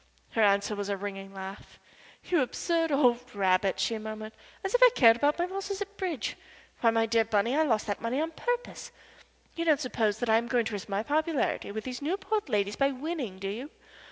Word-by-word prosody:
Her 225 - +1
answer 200 0 +3
was 205 0 -4
a 200 - -1
ringing 195 0 -6
laugh. 195 +1 -9 0.5
"You 345 -4 +2
absurd 330 +5 0
old 245 -4 +2
rabbit," 190 -1 +2
she 225 -1 0
murmured. 215 0 -7 0.3
"As 385 - -2
if - - +3
I - - +10
cared 230 -3 +7
about 290 +4 +2
my 350 - +1
losses 390 +1 -4
at 405 0 -6
bridge! 365 -8 -3 0.4
Why, 230 - +4
my 225 0 +2
dear 225 0 +3
Bunny, 220 +3 +1
I 310 - +3
lost 230 -9 +1
that 205 -2 -3
money 235 +4 -1
on 320 +1 -1
purpose. 485 +8 -3 0.6
You 335 - -2
don't 310 -4 +3
suppose 220 -4 0
that 245 - -2
I 220 0 +5
am 235 +1 -1
going 240 -2 +1
to 220 - -3
risk 205 +1 -5
my 200 +1 -1
popularity 305 -3 0
with 215 +1 -5
these 250 0 -6
Newport 390 +4 -1
ladies 205 -2 0
by 275 0 +3
winning, 270 - -4
do 195 +1 -5
you? 240 +8 -5
235 Hz, 215 wpm, -29 LUFS, 210-315 Hz, 0.6 s, I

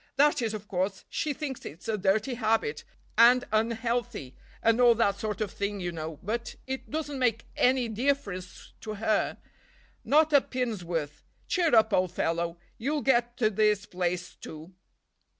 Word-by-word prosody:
"That 290 0 +4
is, 220 -2 -1
of 210 -1 -8
course, 190 +1 -2
she 305 - -1
thinks 285 -2 -5
it's 160 - -9
a 220 - +1
dirty 210 +5 +1
habit, 220 -10 0 0.4
and 245 +2 +7
unhealthy, 230 - -1 0.3
and 230 +2 +4
all 240 -1 +7
that 200 -3 +1
sort 215 0 -3
of 210 -2 -1
thing, 200 0 -3
you 175 -1 -2
know, 160 -2 -6
but 230 +4 -3
it 265 0 -5
doesn't 295 -2 -3
make 235 -3 +1
any 255 -1 +3
difference 220 -6 -3
to 215 -1 -5
her—not 285 +7 -1
a 285 - +7
pin's 245 -8 -3
worth. 165 -4 -4 0.2
Cheer 340 -8 +2
up, 220 -1 +5
old 185 -1 +2
fellow, 170 0 -1 0.2
you'll 285 +5 -1
get 240 -2 +2
to 220 -3 +2
this 210 -1 +2
place 180 0 -2
too." 160 +4 -10
220 Hz, 160 wpm, -28 LUFS, 185-250 Hz, 0.4 s, and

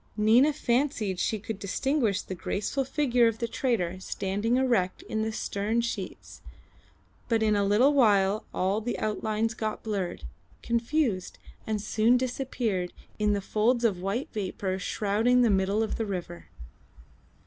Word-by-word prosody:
Nina 230 +8 +5
fancied 240 -8 0
she 220 - 0
could 215 0 -6
distinguish 225 0 0
the - - -6
graceful 205 +9 -2
figure 250 -3 +2
of 225 -1 -1
the 235 - -2
trader 185 -9 -1
standing 200 +5 -1
erect 235 -9 +1
in 220 - -3
the 220 0 -1
stern 215 +1 -1
sheets, 210 -5 -6 0.9
but 225 -2 +2
in 215 -1 +3
a 200 - +2
little 215 +8 +4
while 210 -5 +3
all 195 +4 0
the 240 +2 -3
outlines 215 +1 -1
got 220 -1 -4
blurred, 195 - -3 0.4
confused, 235 - 0 0.3
and 215 -1 -1
soon 220 +4 +3
disappeared 245 -7 -2 0.3
in 210 0 +2
the 200 - -1
folds 235 +5 +1
of 190 -6 +1
white 200 +8 -2
vapour 190 -2 -3
shrouding 220 +6 +2
the 230 - +4
middle 195 +3 +2
of 220 - -3
the 225 - -1
river. 170 - -5
215 Hz, 150 wpm, -28 LUFS, 200-240 Hz, 0.9 s, Nina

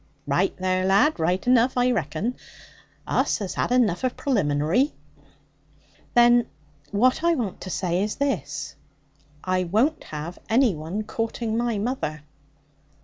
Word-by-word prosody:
'Raight 160 +7 0
there, 185 0 0
lad; 200 +12 +3
raight 180 +4 0
enough, 250 0 +3
I 250 0 +3
reckon. 185 - -2 0.7
Us - - +1
has 200 -4 -4
had - - -1
enough 235 -8 +2
of 255 - -1
pralimbinary.' 185 - +1 1.2
'Then 240 0 +5 0.4
what 255 +9 +2
I 340 0 +3
want 225 - -4
to 185 - -6
say 180 0 -1
is 210 +1 -2
this 145 - -2 0.7
I 185 0 0
won't 240 - +1
have 155 +3 -7
any 235 -1 +4
one 165 +7 -4
courting 225 0 -3
my 235 -1 0
mother.' 200 - -3
210 Hz, 135 wpm, -24 LUFS, 175-245 Hz, 1.2 s, Then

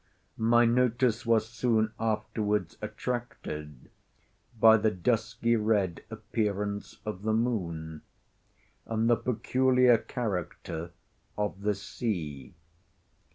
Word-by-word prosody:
My 120 +1 +5
notice 120 -1 +2
was 110 -1 +3
soon 110 -2 +1
afterwards 105 -1 -1
attracted 105 - -5 0.7
by 110 +1 +8
the 110 0 +2
dusky 115 +3 0
red 105 -5 +1
appearance 105 -2 -3
of 105 -3 -4
the 110 +1 0
moon, 85 -10 -2 0.9
and 115 0 0
the 120 - +5
peculiar 125 +1 +3
character 90 - -4 0.5
of 105 -2 -2
the 105 0 +1
sea. 85 - -4
110 Hz, 95 wpm, -29 LUFS, 100-115 Hz, 0.9 s, by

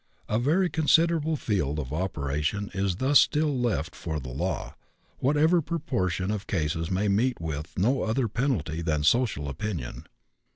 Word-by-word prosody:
A 110 - +1
very 165 +9 +2
considerable 160 0 +3
field 90 - -1
of 70 -2 -4
operation 75 +3 -2
is 95 -1 0
thus 135 +8 +5
still 150 -1 +2
left 120 -9 -1
for 80 -3 -4
the 65 -2 -7
law, 85 +9 -3 0.5
whatever 155 +6 +3
proportion 120 - -1
of 100 -2 -4
cases 80 -2 -1
may 95 +3 0
meet 115 +6 +1
with 75 -1 -5
no 125 +9 +2
other 115 +3 0
penalty 100 - -1
than 75 -3 0
social 105 - +2
opinion. 80 - -5
100 Hz, 150 wpm, -27 LUFS, -, 0.5 s, thus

